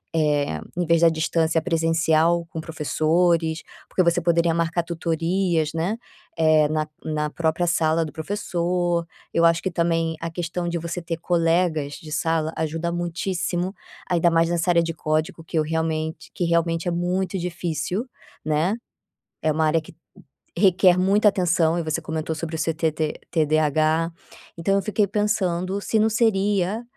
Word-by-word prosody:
eh, 145 - +1 0.2
em 175 - +1
vez 170 0 +3
da 170 - +7
distância, 160 0 +1
presencial 165 0 +2
com 160 - -6
professores? 160 +1 +1 0.3
Porque - - +1
você 170 +1 +2
poderia 170 0 +2
marcar 170 +1 0
tutorias, 165 0 0
né, 175 +8 -1 0.4
eh, 155 -2 +4
na 155 0 -1 0.2
na 150 -1 -2
própria 160 +2 0
sala 165 -1 +2
do 150 - -7
professor, 175 -1 -1 0.3
eu 170 - +3
acho 165 0 +4
que 190 - -1
também 165 -1 0
a 165 - -3
questão 175 +1 -3
de 170 - -2
você 170 +2 -4
ter 165 -1 -4
colegas 165 -3 +1
de 155 -1 -10
sala 160 -1 0
ajuda 165 +2 -2
muitíssimo, 175 +1 -2 0.4
ainda 170 -1 +3
mais 165 0 +3
nessa 175 +1 0
área 170 -1 +4
de 165 0 -3
código 155 +1 -2
que 160 - -4
eu - - +2
realmente 160 +1 -2
que 175 - -2
realmente 170 0 +1
é - - +1
muito 180 +2 -1
difícil, 180 - -3 0.4
né? 155 +6 +1 0.7
É 155 - +2
uma 155 +1 +1
área 160 +1 +2
que 155 - -14 0.6
requer 185 -1 +5
muita 200 +3 +4
atenção 175 -3 +2
e - - 0
você 155 0 -2
comentou 160 0 -3
sobre 160 +1 -4
o - - -7
seu 165 +1 0
TT 155 -1 -1
TDH, 155 +1 +2 0.5
então 195 +4 +1
eu 200 - +1
fiquei 210 +1 +1
pensando 200 -2 0
se 220 - +1
não 220 - +4
seria 205 -2 +1
165 Hz, 160 wpm, -23 LUFS, 160-175 Hz, 0.7 s, da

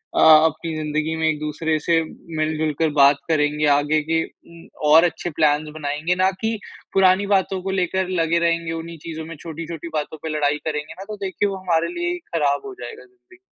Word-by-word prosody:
अ, - - +2
अपनी 160 +1 +5
ज़िंदगी 155 +1 -2
में 160 0 0
एक-दूसरे 155 +1 -1
से 165 +2 +2 0.4
मिल-जुल 155 0 0
कर 160 -1 +3
बात 140 -1 +6
करेंगे, 150 -1 +1
आगे 145 +2 +3
के 165 0 +2
उम, 170 0 -17 0.2
और 160 +2 +8
अच्छे 175 0 -1
प्लान्स 150 -1 +1
बनाएँगे, 155 +3 -1
ना 185 +1 +3
कि 225 0 -1 0.4
पुरानी 190 +1 +4
बातों 195 -1 +1
को 190 - -2
लेकर 185 +1 0
लगे 165 +1 +2
रहेंगे 170 -1 0
उन्ही 165 0 -6
चीज़ों 160 -1 -5
में 165 +1 -8
छोटी-छोटी 165 0 -7
बातों 155 0 -3
पे 160 - -3
लड़ाई 145 0 +1
करेंगे 155 0 -3
ना, 190 - -9
तो 215 +1 -6
देखिए 195 +2 -1
वो 195 - -4
हमारे 170 -3 0
लिए 350 0 -1
ही - - -4 0.2
ख़राब 145 -3 +1
हो 400 - -7
जाएगा। 455 +1 -8
जी। 375 -1 -23
160 Hz, 195 wpm, -22 LUFS, 155-180 Hz, 0.4 s, और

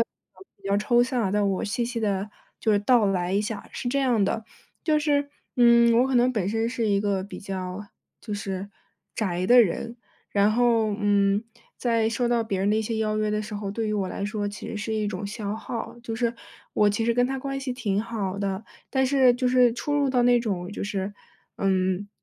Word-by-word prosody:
能 385 - -15 0.2
比 - - -4
较 200 - +3
抽 240 +4 +3
象 245 0 +1
啊， 195 - 0
但 205 0 +2
我 190 - -1
细 235 +4 -1
细 235 0 -3
地 200 -1 -1 0.3
就 220 - +1
是 205 - +4
道 230 0 +4
来 180 -2 0
一 200 - +2
下。 215 +1 -5
是 245 - -4
这 275 +3 +1
样 245 -6 +2
的， 220 +3 -1 0.4
就 310 -2 +2
是， 285 -1 +1 0.3
嗯， 235 -1 +6
我 260 - +2
可 265 - +2
能 245 +1 +4
本 205 -6 -1
身 225 +2 0
是 235 -2 -1
一 200 -1 +2
个 200 -2 0
比 200 - -8
较 190 +1 -5 0.3
就 210 - -5
是 195 -1 -4 0.5
宅 185 -4 -1
的 245 +3 +8
人， 230 +4 -3 0.3
然 200 +1 +3
后， 230 -2 +2
嗯， 205 0 +2 0.3
在 230 -2 +1
受 240 +2 0
到 235 -1 +2
别 205 -4 -2
人 195 +2 +1
的 - - +3
一 220 - +1
些 225 +1 -3
邀 215 -1 0
约 215 0 0
的 210 0 0
时 210 0 -6
候， 205 -1 -4
对 220 +2 -2
于 215 - -1
我 200 -3 -1
来 200 - -4
说 205 0 -2
其 205 - -8
实 - - -5
是 210 +2 -3
一 215 -1 0
种 205 -1 -4
消 205 0 -4
耗， 230 +2 -6
就 230 -2 -4
是， 235 0 0 0.4
我 210 -1 +4
其 225 +2 -1
实 235 0 +2
跟 245 +1 +3
他 265 +2 -2
关 275 +1 -4
系 265 -2 -3
挺 215 -5 -1
好 205 -4 -3
的， 200 +1 -3 0.3
但 265 -1 +2
是 260 -2 +5
就 250 +1 -1
是 250 -1 +5
出 290 +5 -2
入 285 -2 +2
到 250 -2 +2
那 245 0 +5
种， 190 -6 -3
就 - - -5
是， 200 0 -3 0.4
嗯， 190 0 0
215 Hz, 245 characters per minute, -25 LUFS, 200-240 Hz, 0.5 s, 的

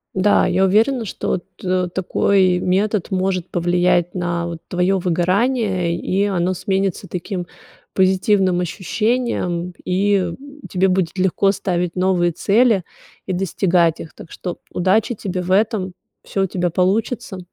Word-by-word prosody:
Да, 195 0 +3
я 185 +1 +2
уверена, 225 +5 +2
что 190 - -2 0.2
т 185 -1 0
такой 190 0 +2
метод 195 +2 0
может 185 -1 -1
повлиять 175 0 +1
на, 175 -1 -2
вот, 170 -1 -6
твоё 180 +2 +1
выгорание, 185 +1 +1
и 190 +3 -1
оно 185 -2 0
сменится 195 0 -1
таким 180 0 -4 0.5
позитивным 190 -1 +2
ощущением, 180 -1 -1
и 185 -1 +1 0.3
тебе 190 +1 +1
будет 185 -1 0
легко 190 +1 +2
ставить 180 -3 -2
новые 180 -1 +2
цели 210 +3 +2 0.4
и 190 - -1
достигать 175 -2 +1
их. 160 - -9
Так 165 - -12
что 180 -2 -5
удачи 200 +6 +1
тебе 190 -4 -4
в 180 - -4
этом, 195 -2 +1 0.3
всё 195 - -1
у - - +1
тебя 175 -1 -1
получится. 195 +3 -1
185 Hz, 135 wpm, -20 LUFS, 180-195 Hz, 0.5 s, Да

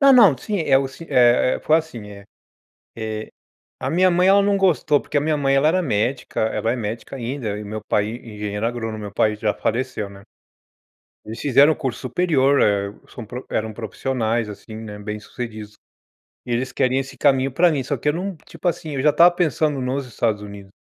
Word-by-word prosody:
Não, 275 -1 +7
não, 205 - +7
sim, 210 -3 -3
é 140 -4 +4
o 135 - -1
sim 165 +5 -12
é 125 0 +4
é - - -11
foi 155 - +4
assim, 120 -10 -5
eh 100 -1 -11 0.7
eh, 110 -1 -4 0.5
a - - -2
minha 185 +3 +4
mãe 180 +2 +3
ela 200 +1 +6
não 200 0 +2
gostou, 160 -6 +3
porque 145 - -2
a - - +3
minha 155 0 +1
mãe 135 -1 +2
ela 140 +3 +4
era 185 +3 +2
médica, 120 -1 -1
ela 110 +1 0
é - - 0
médica 115 +3 -5
ainda, 120 -4 -4
e - - -6
meu 105 +1 -6
pai 105 - +2
e 115 -1 -8
engenheiro 105 +1 -3
agrônomo, 115 -2 -3
meu 105 -1 -7
pai 105 0 +2
já 105 -1 0
faleceu, 115 -3 -2
né. 100 0 -13 1.0
Eles 110 +2 -7
fizeram 145 +3 +5
curso 135 -6 -4
superior, 140 -1 +2
eh, 100 -1 +1 0.2
são 120 - -9
pro 125 +4 -8
eram 110 0 -2
profissionais 115 0 -2
assim, 110 +2 -10
né, 105 -2 -8
bem 105 +1 -5
sucedidos, 110 -2 -7 0.7
e 120 - -3
eles 130 +2 -1
queriam 130 0 +1
esse 135 0 -8
caminho 135 -2 +3
para 175 +4 +4
mim, 140 -4 -1
só 140 - -2
que 150 - -2
eu - - +3
não 185 +2 -4
tipo 165 +1 -9
assim, 155 -2 -3
eu 135 - -1
já 150 - +5
estava 170 +4 +6
pensando 155 -4 0
nos 130 +1 -2
Estados 110 -2 -1
Unidos. 100 -1 -10
125 Hz, 210 wpm, -21 LUFS, 110-150 Hz, 1.0 s, Não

